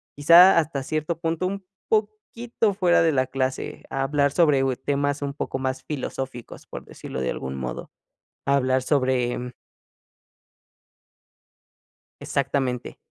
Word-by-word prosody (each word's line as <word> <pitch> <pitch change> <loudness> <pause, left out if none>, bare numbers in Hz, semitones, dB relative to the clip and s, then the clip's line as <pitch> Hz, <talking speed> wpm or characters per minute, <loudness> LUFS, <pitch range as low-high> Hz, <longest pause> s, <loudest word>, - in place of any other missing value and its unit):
quizá, 170 +6 +7
hasta 150 -3 -2
cierto 155 +3 -2
punto 165 +1 -1
un 195 0 -5 0.2
poquito 215 +1 -1
fuera 180 -4 +3
de 165 - +3
la 130 -3 +1
clase, 130 0 -3
a 135 0 -2
hablar 140 0 +1
sobre 150 -4 +3 0.2
temas 145 +1 -1
un 140 -1 -3
poco 135 -2 -4
más 130 0 -3
filosóficos, 130 -3 -6
por - - -8
decirlo - - -8
de 65 - -1
algún 65 0 -5
modo, 65 -1 -6 0.6
hablar 130 -2 +2
sobre 125 -3 0 2.7
Exactamente, 135 -3 -2
140 Hz, 120 wpm, -24 LUFS, 130-165 Hz, 2.7 s, quizá